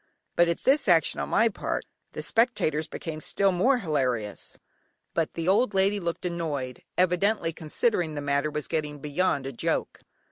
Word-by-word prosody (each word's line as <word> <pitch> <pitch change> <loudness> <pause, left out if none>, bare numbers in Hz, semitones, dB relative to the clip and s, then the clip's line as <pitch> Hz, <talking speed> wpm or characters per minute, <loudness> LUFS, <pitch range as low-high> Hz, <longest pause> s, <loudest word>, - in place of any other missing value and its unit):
At 170 -1 +2
this 280 0 +3
action 170 -3 +4
on - - -3
my 225 - +4
part 220 - -3 0.3
the - - -5
spectators 160 - +1
became 155 -1 -6
still 195 +5 +2
more 245 +9 +3
hilarious, 130 - -2 0.6
but 165 -2 -1
the 165 0 -3
old 205 +2 +3
lady 195 +2 +3
looked 170 -1 -4
annoyed, 150 -7 -3 0.2
evidently 180 0 +2
considering 160 +1 -1
the 145 - -3
matter 140 +1 0
was 150 -1 -3
getting 150 -2 -2
beyond 145 0 0
a 135 - -3
joke. - - -2
165 Hz, 155 wpm, -27 LUFS, 150-195 Hz, 0.6 s, action